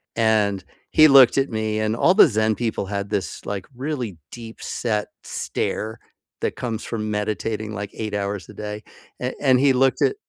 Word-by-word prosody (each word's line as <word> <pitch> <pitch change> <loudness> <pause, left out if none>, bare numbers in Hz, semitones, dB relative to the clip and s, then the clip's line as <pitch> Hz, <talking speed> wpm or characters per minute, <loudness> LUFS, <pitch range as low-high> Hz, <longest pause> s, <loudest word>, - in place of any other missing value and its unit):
And 105 -4 +2 0.3
he 155 - +7
looked 135 -2 +7
at 135 - 0
me, 110 -1 -2
and 110 +1 0
all 175 - +4
the 200 - +8
Zen 110 -3 +1
people 115 -3 -2
had 100 0 -4
this, 95 -8 -3
like, 100 -2 -4
really 130 - -4
deep-set 115 -2 -3 0.2
stare 110 +2 -3 0.4
that - - -1
comes 115 -3 -4
from 110 -2 -3
meditating, 110 +1 -2
like, 100 -1 -5
8 110 -2 -5
hours 100 -1 -3
a - - -12
day. 105 0 -6 0.4
A 125 +1 -2
and 130 -2 +4
he 135 0 +4
looked 135 +1 +2
at - - +3
110 Hz, 175 wpm, -22 LUFS, 105-125 Hz, 0.4 s, the